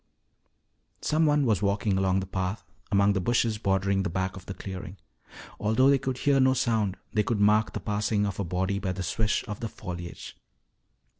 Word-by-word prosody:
Someone 150 -2 +3
was 110 -5 +2
walking 100 0 +1
along 95 0 +2
the - - -4
path 95 +1 -3 0.3
among 100 0 +4
the 95 - 0
bushes 115 0 +1
bordering 95 -1 +1
the 100 - -1
back 95 +2 -2
of 95 -1 -11
the 100 - -4
clearing. 95 0 -7 0.6
Although 110 +6 +4
they 140 - +4
could 130 -1 -3
hear 140 +1 +3
no 130 0 +4
sound, 110 -6 0 0.2
they 105 - +3
could 105 0 -1
mark 105 +1 +3
the - - -3
passing 105 0 0
of 100 - -4
a - - 0
body 95 +3 -1
by 95 -2 -2
the 95 0 -4
swish 105 +4 0
of 105 -1 -5
the 115 - -4
foliage. 90 -4 -8
100 Hz, 190 wpm, -27 LUFS, 95-110 Hz, 0.6 s, among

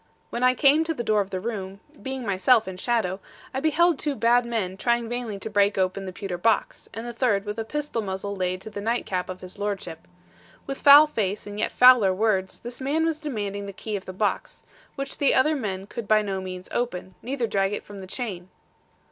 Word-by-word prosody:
When 235 - -3
I 255 0 +4
came 285 +4 +5
to 325 0 -2
the 240 - -3
door 215 -2 +2
of 195 - -5
the 185 - -3
room, 195 -2 -5 0.2
being 265 -2 -5
myself 205 +3 +3
in 190 -1 -6
shadow, 200 -3 0 0.3
I 265 - -1
beheld 315 +2 +3
two 295 -2 -1
bad 235 +1 +3
men 210 -6 -2
trying 235 +3 0
vainly 240 -3 -4
to 195 - -6
break 205 -1 +2
open 190 +1 0
the 185 - -5
pewter 180 -1 -5
box, 220 +3 0
and 225 +2 -6
the 240 - -5
third 220 -5 +1
with 210 +2 -4
a - - -1
pistol 295 -1 -3
muzzle 200 0 -4
laid 185 -1 -2
to 220 - -9
the 205 - -6
night 230 +3 -1
cap 185 -1 -2
of 185 0 -7
his 185 0 -9
lordship. 195 -5 -4 0.6
With 275 -1 -6
foul 290 +1 +9
face 210 -8 -2
and 205 0 -7
yet - - 0
fouler 245 -7 +6
words, 190 -2 0
this 240 +2 -6
man 300 +5 +1
was 320 -2 -1
demanding 205 -9 -4
the 200 - -7
key 210 +2 -5
of 195 - -5
the - - -6
box, 205 +3 -2 0.3
which 275 -1 -5
the 280 - +3
other 305 +4 +3
men 195 -8 -3
could 215 +1 -7
by 215 0 +4
no 195 -2 -3
means 185 -1 -7
open, 185 -6 -3
neither 255 0 -2
drag 195 -3 0
it 210 - -4
from 205 -1 -10
the 190 - -9
chain. 190 -5 -5
215 Hz, 225 wpm, -25 LUFS, 190-245 Hz, 0.6 s, foul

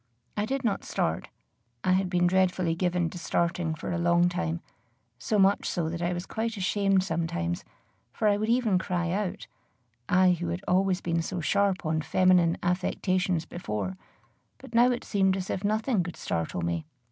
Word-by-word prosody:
I 205 +1 -1
did 270 +2 -2
not 225 -4 0
start. 80 0 -1 0.6
I 185 - +2
had 185 0 +2
been 175 -1 +2
dreadfully 185 -2 +2
given 175 -1 0
to 180 - -7
starting 170 -1 0
for 165 - -5
a 170 - -1
long 175 +1 +3
time, 85 - -2 0.6
so 215 - 0
much 195 0 +3
so 165 -2 -1
that 170 +1 -4
I 175 +1 0
was 175 0 -3
quite 225 0 -3
ashamed 195 0 +2
sometimes, 160 - -2 0.5
for 215 - 0
I 205 - +4
would 215 +2 -1
even 230 -6 +3
cry 175 -2 -1
out, 195 -1 -2 0.6
I 185 0 +5
who 175 -1 -1
had 170 +3 -3
always 185 0 +2
been 165 -1 0
so 180 +2 -4
sharp 185 +4 +1
on 155 0 0
feminine 180 0 +3
affectations 180 -1 0
before; 105 - -4 0.6
but - - -13
now 240 +2 +6
it 245 -1 -1
seemed 190 -2 +2
as 190 -1 -4
if 190 - -3
nothing 215 +1 +1
could 175 0 -6
startle 85 +1 -2
me. 85 -1 -2
180 Hz, 180 wpm, -28 LUFS, 170-195 Hz, 0.6 s, now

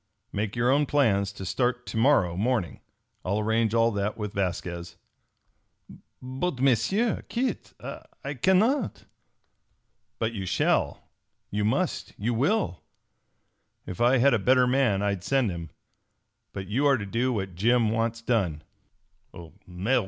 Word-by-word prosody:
Make 105 +1 -2
your 120 +2 +2
own 145 +1 +3
plans 100 -9 +2
to 95 -1 -8
start 125 +4 -1
to - - -7
morrow 110 -8 +3
morning. 105 - -1 0.4
I'll 100 +3 -1
arrange 110 +1 +1
all 115 0 +4
that 100 0 -2
with 105 -2 -4
Vasquez." 85 -2 -3 1.2
"But, 130 +4 -3
M'sieu 140 - +2
Kit, 250 +2 -2
I 140 - -8
cannot!" 190 - +1 1.1
"But 115 0 -1
you 95 -4 -4
shall, - - 0 0.4
you 105 +1 -1
must, 105 - -1
you 115 +4 -1
will! 135 - 0 1.0
If 90 - -6
I 125 +2 +5
had 135 +2 +4
a 115 - +3
better 125 +5 +4
man 125 -6 +2
I'd 100 -3 -1
send 135 -7 +1
him, 85 -2 -6 0.8
but 95 - -6
you 125 +9 +1
are 140 -2 +4
to 100 - -5
do 120 +6 0
what 95 -5 -3
Jim 115 +4 +2
wants 115 0 -1
done." 95 -11 0
115 Hz, 135 wpm, -26 LUFS, 100-130 Hz, 1.2 s, I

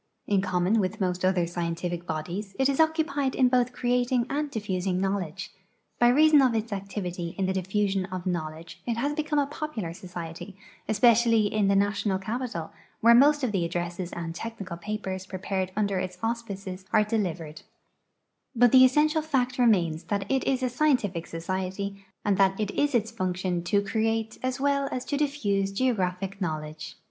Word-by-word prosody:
In 200 -2 +2
common 185 +3 +1
with 185 -2 -1
most 180 -2 -1
other 185 -2 +2
scientific 175 0 -3
bodies, 175 +6 -4
it 265 - +3
is 275 +1 0
occupied 315 -4 +1
in 255 -2 +4
both 250 -1 +2
creating 245 0 +1
and 295 +1 -1
diffusing 190 -6 -2
knowledge. 190 -2 -2 0.5
B}' 240 - +6
reason 300 +2 +6
of 255 -3 +3
its 220 0 -2
activity 185 -3 -4
in 195 - 0
the 190 - 0
diffusion 195 0 0
of 185 -1 -6
knowledge 165 -2 -4
it 235 -1 -1
has 285 +5 0
become 300 0 -1
a 285 - +3
popular 285 - -5
societ}% 175 +1 -8 0.3
especially 230 -1 +4
in 210 -2 +2
the 200 - +3
national 200 0 +1
capital, 215 -4 -4 0.3
where 235 +1 +7
most 290 +4 +5
of 250 - +1
the 190 -4 0
addresses 175 +1 -3
and 165 -1 -4
technical 200 -2 -6
papers 190 0 -5
prepared 190 0 -3
under 200 -3 0
its 185 -1 -4
auspices 200 -5 -4
are 215 - +5
delivered; 175 -8 -3 0.9
but 240 0 +5
the 260 -1 +8
essential 300 +4 +4
fact 260 -5 -1
remains 175 -9 +2
that 200 -1 -1
it 265 -1 +2
is 265 -1 0
a 255 - +1
scientific 245 - +1
society 190 +3 -4 0.2
and 200 -2 +2
that 195 0 +3
it 210 -2 -1
is 290 -2 +1
its 220 -1 +1
function 185 -4 -2
to 200 +2 +2
create 225 +2 -1
as 255 +1 -2
well 280 0 +1
as 255 - -3
to 290 - -2
diffuse 215 -10 0
geographic 195 -4 -1
knowledge. 155 -2 -4
200 Hz, 170 wpm, -27 LUFS, 185-245 Hz, 0.9 s, the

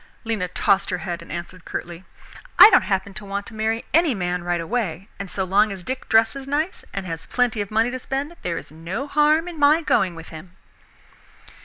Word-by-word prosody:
Lena 220 -6 -2
tossed 190 +2 +1
her 180 - -1
head 175 -1 -5
and - - -11
answered 170 +1 -7
curtly, 175 +1 -6 0.5
"I 440 - +11
don't - - +5
happen 195 0 -1
to 210 +2 -5
want 200 0 -4
to - - -10
marry 220 +1 -1
any 325 -5 +4
man 180 -2 -2
right 175 0 -1
away, 190 0 -3
and 200 -1 -5
so 190 - -1
long 200 +3 +3
as 190 -2 -7
Dick 260 +7 -5
dresses 225 +5 +3
nice 305 +6 -1
and 195 -1 -5
has 165 -2 -6
plenty 245 -4 0
of 200 - -4
money 225 +3 +1
to 255 - -4
spend, 275 +6 -4
there 170 -2 -2
is - - -9
no 170 - -5
harm 300 +3 +3
in 340 -3 -7
my 295 +3 +5
going 185 - +2
with 165 0 -10
him." 170 +3 -11
200 Hz, 210 wpm, -22 LUFS, 180-255 Hz, 0.5 s, I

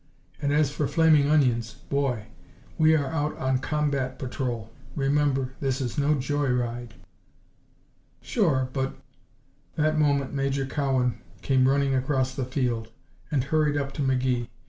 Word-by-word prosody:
And 145 -1 0
as 150 -1 +3
for 145 -1 -1
flaming 155 -3 +4
onions 120 -7 +2
boy! 135 -6 -2 0.5
We 160 0 +5
are 145 -2 +1
out 150 -1 -1
on 130 -1 0
combat 140 -3 -1
patrol, 120 -4 -4 0.2
remember. 135 -2 +1
This 135 -1 -1
is 125 -3 -3
no 150 +1 +2
joy 145 +1 -1
ride." 120 -1 -2 1.2
"Sure. 150 - +1
But 135 -1 -2 0.4
" - - -38
That 155 0 +1
moment 140 -2 +1
Major 135 0 0
Cowan 130 -4 0 0.2
came 130 -1 +3
running 140 0 +2
across 130 0 0
the 130 -1 -3
field 120 -4 -2 0.4
and 145 -5 +1
hurried 150 +1 +1
up 140 -1 -2
to - - -4
McGee. 130 -3 +1
135 Hz, 145 wpm, -26 LUFS, 130-145 Hz, 1.2 s, We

